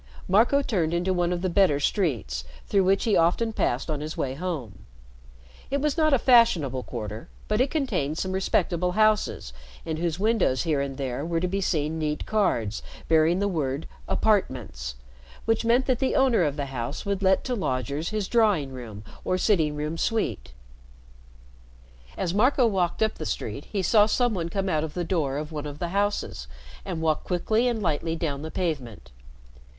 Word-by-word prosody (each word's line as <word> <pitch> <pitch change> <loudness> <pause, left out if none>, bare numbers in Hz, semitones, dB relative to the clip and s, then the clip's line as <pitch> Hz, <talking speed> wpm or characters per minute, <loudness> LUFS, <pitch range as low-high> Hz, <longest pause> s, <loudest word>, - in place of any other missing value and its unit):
Marco 235 +9 +4
turned 175 -10 0
into 180 +2 +1
one 175 -1 +1
of 175 0 -2
the - - +2
better 170 -5 +3
streets, 120 - -1 0.2
through 195 -2 +2
which 195 +1 +2
he 220 -4 +2
often 200 +7 +2
passed 125 - 0
on 150 -3 -3
his 155 +1 -5
way 130 - -1
home. 140 - -5 0.9
It 280 +1 0
was 300 0 0
not 310 -2 +3
a 275 - +5
fashionable 190 - +4
quarter, 110 -3 -6 0.2
but 210 +3 +1
it 265 - +2
contained 195 - -1
some 185 - -2
respectable 180 -2 0
houses 215 - +1 0.3
in 160 -1 -3
whose 165 -1 -1
windows 205 - +2
here 155 -5 +1
and 135 -1 -4
there 135 -1 -3
were 165 +1 -1
to 180 - 0
be 195 +2 -2
seen 160 -3 -1
neat 150 -1 -2
cards 150 - 0 0.3
bearing 160 +2 +4
the 200 +1 +1
word 150 -5 -2 0.2
"Apartments," 120 - 0 0.5
which 225 0 +1
meant 240 +3 +3
that 255 -2 +1
the 265 - 0
owner 260 -6 +4
of 145 -4 +1
the 145 -2 -2
house 125 - -4
would 200 -1 -1
let 190 0 +3
to 255 - -2
lodgers 140 - -2
his 215 -3 -2
drawing 205 - +2
room 115 -5 -8 0.2
or 185 - 0
sitting 165 -7 +2
room 150 +2 -3
suite. 220 - -1 1.7
As 175 -2 -1
Marco 250 +5 +4
walked 190 -3 +1
up 220 - -1
the 155 - -4
street, 115 +7 -4
he 195 -2 -3
saw 210 +3 +5
some 245 +1 +1
one 170 -4 -2
come 195 +2 -2
out 155 -4 +1
of 155 -2 -6
the 175 - -1
door 155 -6 -1
of 150 +1 -5
one 150 -1 -4
of 145 0 -7
the 170 +2 -3
houses 200 - -1 0.4
and 160 - -4
walk 155 -1 +1
quickly 215 +7 +1
and 230 -3 -1
lightly 165 0 0
down 145 -4 -3
the 160 - -5
pavement. 125 - -4
170 Hz, 185 wpm, -26 LUFS, 145-210 Hz, 1.7 s, a